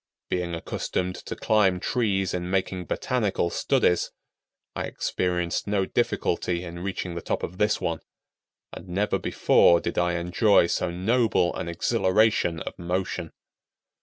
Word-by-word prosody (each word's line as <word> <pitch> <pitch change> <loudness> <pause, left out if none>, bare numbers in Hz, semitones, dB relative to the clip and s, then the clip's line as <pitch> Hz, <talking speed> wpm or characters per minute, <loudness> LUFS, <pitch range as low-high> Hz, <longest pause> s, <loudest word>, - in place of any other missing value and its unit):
Being 90 -2 -1
accustomed 90 +2 -3
to - - -4
climb 100 -4 +2
trees 95 -4 0
in 90 0 -3
making 95 -1 -1
botanical 105 -9 -1
studies, 90 - +2 0.7
I - - -2
experienced 90 0 -2
no 100 -2 +1
difficulty 90 -1 -1
in 85 -1 -7
reaching 95 -1 -4
the 85 - -5
top - - -2
of 90 +2 -5
this 105 0 +2
one, 80 -1 -2 0.7
and 90 - -9
never 100 +4 0
before 85 -1 +4
did 85 - -2
I 90 0 +1
enjoy 90 +4 +3
so 90 +1 -1
noble 100 +1 +1
an 85 - -4
exhilaration 95 0 +2
of - - -7
motion. 90 +2 -3
90 Hz, 135 wpm, -26 LUFS, 85-100 Hz, 0.7 s, before